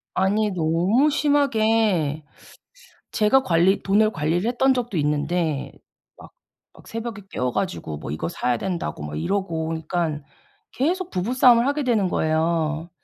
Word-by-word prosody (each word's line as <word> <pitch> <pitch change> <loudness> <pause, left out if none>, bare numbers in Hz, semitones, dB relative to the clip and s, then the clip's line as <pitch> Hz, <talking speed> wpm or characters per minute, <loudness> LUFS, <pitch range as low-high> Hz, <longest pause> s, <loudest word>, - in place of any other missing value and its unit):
아니 205 +3 +1
너무 180 - +2
심하게 225 - +1 0.9
제가 220 +5 +3
관리 180 -1 +2
돈을 210 +2 +3
관리를 165 +7 -1
했던 260 +2 +2
적도 240 -6 -3
있는데 150 0 -1 0.4
막 - - -15 0.5
막 - - -18
새벽에 225 -2 -6
깨워 125 0 -2
가지고 185 - -3
뭐 75 - -7
"이거 80 +3 -3
사야 120 +7 -1
된다."고 170 - -4
막 75 0 -5
이러고 165 - -2
그러니까 165 -1 -2 0.5
계속 350 +7 -1
부부 185 +7 -2
싸움을 250 -1 +5
하게 285 +1 0
되는 225 -6 +2
거예요. 160 0 0
185 Hz, 290 characters per minute, -23 LUFS, 160-230 Hz, 0.9 s, 싸움을